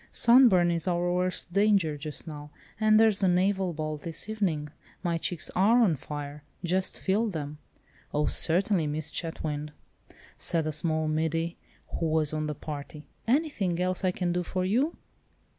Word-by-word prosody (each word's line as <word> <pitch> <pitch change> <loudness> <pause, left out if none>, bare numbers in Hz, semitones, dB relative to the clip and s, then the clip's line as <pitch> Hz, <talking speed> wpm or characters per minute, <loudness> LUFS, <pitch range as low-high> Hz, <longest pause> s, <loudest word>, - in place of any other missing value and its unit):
Sunburn 235 -8 +6
is 170 +1 -2
our 175 0 +1
worst 180 -1 0
danger 200 -6 +3
just 150 0 -7
now, 150 -2 -8 0.3
and 215 0 +5
there's 220 -2 +4
the 195 - +3
naval 185 +1 +2
ball 155 -1 -4
this 165 +5 -4
evening. 180 -9 -1 0.3
My 170 -2 0
cheeks 165 -1 -3
are 215 +6 +4
on 200 -9 +4
fire, 145 +1 -7 0.2
just 185 +2 0
feel 210 +4 +1
them." 150 -6 -5 0.5
"Oh, 150 0 +1
certainly, 175 0 +2
Miss 150 +1 -3
Chetwynd!" 150 -3 -4 0.7
said 165 -2 +1
a 155 - -1
small 155 0 0
middy, 160 +2 -1 0.4
who 165 - 0
was 155 -1 +1
of 155 0 -2
the 150 - -3
party. 150 +1 -8 0.2
"Anything 230 - +1
else 185 +1 -1
I 185 - +3
can 180 -1 -1
do 180 - 0
for 185 +1 -2
you?" 255 - +1
175 Hz, 160 wpm, -28 LUFS, 155-190 Hz, 0.7 s, Sunburn